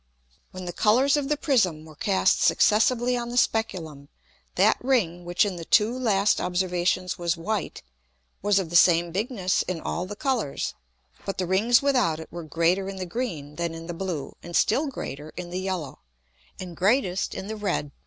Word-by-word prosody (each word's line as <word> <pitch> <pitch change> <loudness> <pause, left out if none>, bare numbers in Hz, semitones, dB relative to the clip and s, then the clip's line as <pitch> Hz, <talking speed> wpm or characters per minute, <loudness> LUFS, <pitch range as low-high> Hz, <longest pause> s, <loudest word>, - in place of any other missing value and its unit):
When 185 0 -8
the 175 - -5
Colours 250 - +3
of 290 -2 -1
the 300 - +1
Prism 190 - +1
were 155 - -13
cast 190 +3 +2
successively 240 +3 +3
on 240 -1 -3
the 245 - -4
Speculum, 165 - -1 0.5
that - - +3
Ring 185 -10 0
which 175 +4 +2
in 190 -3 -3
the 170 - -6
two 215 +7 +3
last 210 -5 +2
Observations 180 0 -1
was 170 0 0
white, 205 +3 -3 0.6
was 205 0 +2
of 180 -4 -1
the - - -3
same 170 0 +5
bigness 195 -1 0
in 185 -3 -3
all 175 +3 -3
the 205 - -6
Colours, 235 - -2 0.5
but 195 - -4
the 185 - -1
Rings 225 +7 +3
without 250 - +2
it 160 - -10
were 175 - -6
greater 170 +5 0
in 195 - -6
the 185 -1 -4
green 170 - -5
than 170 -1 -2
in 165 0 -8
the 175 - -5
blue, 170 -5 -4
and 175 0 -7
still 275 - +2
greater 150 - -6
in 175 -1 -6
the 180 - -3
yellow, 185 -7 -4 0.6
and 180 -2 -7
greatest 195 -1 +1
in - - -5
the 220 +2 -5
red. 190 -8 -2
185 Hz, 185 wpm, -25 LUFS, 170-220 Hz, 0.6 s, same